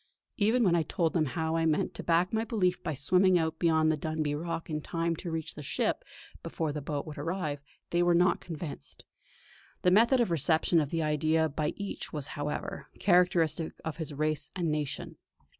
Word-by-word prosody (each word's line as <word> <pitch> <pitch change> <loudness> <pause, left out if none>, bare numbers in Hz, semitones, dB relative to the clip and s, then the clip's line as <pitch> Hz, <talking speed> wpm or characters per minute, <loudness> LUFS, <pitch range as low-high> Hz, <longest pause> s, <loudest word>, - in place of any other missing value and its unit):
Even 225 +4 +3
when 180 -5 +4
I 170 - +3
told 165 +1 0
them 160 -3 +2
how 160 +3 -1
I 165 0 +2
meant 155 -1 +1
to - - -6
back 175 +3 +2
my 220 0 +1
belief 190 -6 0
by 155 - -3
swimming 180 +6 +4
out 160 -1 -1
beyond 160 -2 +3
the 155 - 0
Dunbuy 155 -1 -2
Rock 165 +2 -4
in 155 -1 -3
time 165 +2 -1
to 175 - -5
reach 160 -1 -3
the - - -8
ship 140 - -1 0.4
before 160 -2 -3
the 150 0 -4
boat 145 0 -3
would 155 -3 -8
arrive, 155 -2 -2 0.3
they 175 - +2
were 175 0 +4
not 180 +1 +3
convinced. 160 - -8 0.8
The 180 - +5
method 235 +6 +5
of 235 -7 +2
reception 165 +2 +3
of 145 - -2
the 165 0 -1
idea 155 +1 +2
by 150 +1 -2
each 200 -1 -5
was, 150 -3 -3
however, 145 -1 -4
characteristic 175 -4 +2
of 160 - -4
his 160 -2 -5
race 155 +1 -2
and 170 -4 0
nation. 150 -2 -3
160 Hz, 195 wpm, -30 LUFS, 150-175 Hz, 0.8 s, The